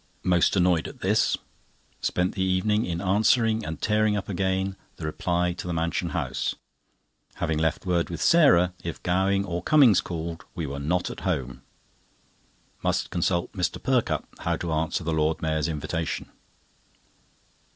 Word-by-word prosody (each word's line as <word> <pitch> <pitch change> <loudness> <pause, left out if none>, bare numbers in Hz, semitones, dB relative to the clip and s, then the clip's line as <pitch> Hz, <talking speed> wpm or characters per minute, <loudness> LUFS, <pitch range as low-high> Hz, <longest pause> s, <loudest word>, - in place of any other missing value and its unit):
Most 90 0 +3
annoyed 90 -3 +3
at - - -11
this. - - +2 0.6
Spent 90 +1 0
the 95 - -3
evening 95 +4 +1
in 85 -1 -2
answering, 110 +3 +3
and 80 -4 -5
tearing 105 -1 +2
up 100 - -4
again, 95 0 -1 0.2
the 80 - -7
reply 90 +3 0
to 90 - -7
the 90 - -2
Mansion 85 +2 -1
House, 70 -8 -2 0.8
having 80 -2 -1
left 80 +3 0
word 85 -2 +1
with 85 -2 -5
Sarah 90 - +5
if 85 - -6
Gowing 95 +2 +1
or 90 -2 -3
Cummings 130 - +5
called 85 -1 -5
we 85 -4 -3
were 70 0 -5
not 90 +5 -1
at - - -8
home. 65 -9 -2 1.2
Must - - -1
consult 85 0 0
Mr. 90 -3 -1
Perkupp - - 0
how - - 0
to 85 -2 -3
answer 80 +2 -1
the 80 0 -1
Lord 80 0 +1
Mayor's 80 -2 0
invitation. 80 +1 -3
90 Hz, 150 wpm, -26 LUFS, 80-95 Hz, 1.2 s, Sarah